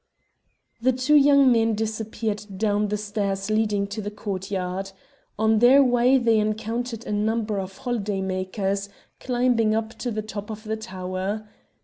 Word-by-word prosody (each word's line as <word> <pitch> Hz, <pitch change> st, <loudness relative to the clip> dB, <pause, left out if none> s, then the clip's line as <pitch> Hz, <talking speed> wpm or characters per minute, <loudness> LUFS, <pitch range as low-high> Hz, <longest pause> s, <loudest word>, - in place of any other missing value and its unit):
The 260 Hz, +2 st, +3 dB
two 255 Hz, +4 st, +1 dB
young 280 Hz, -2 st, +6 dB
men 225 Hz, -1 st, +3 dB
disappeared 220 Hz, -1 st, -3 dB
down 210 Hz, 0 st, +1 dB
the 210 Hz, +1 st, -1 dB
stairs 200 Hz, -1 st, -2 dB
leading 210 Hz, -2 st, +1 dB
to 215 Hz, +2 st, -4 dB
the 205 Hz, -, -4 dB
courtyard. 195 Hz, -2 st, -4 dB, 0.4 s
On 220 Hz, 0 st, +3 dB
their 260 Hz, +4 st, +7 dB
way 250 Hz, +1 st, +4 dB
they 230 Hz, -3 st, +3 dB
encountered 225 Hz, +2 st, -2 dB
a -, -, -5 dB
number 215 Hz, 0 st, 0 dB
of 190 Hz, 0 st, -6 dB
holiday 210 Hz, -5 st, -2 dB
makers, 190 Hz, +1 st, -2 dB, 0.3 s
climbing 240 Hz, -3 st, +1 dB
to 225 Hz, +3 st, -6 dB
the 215 Hz, -2 st, -3 dB
top 210 Hz, -1 st, -7 dB
of 215 Hz, 0 st, -7 dB
the 220 Hz, 0 st, -2 dB
tower. 190 Hz, +1 st, -4 dB
215 Hz, 145 wpm, -24 LUFS, 200-230 Hz, 0.4 s, their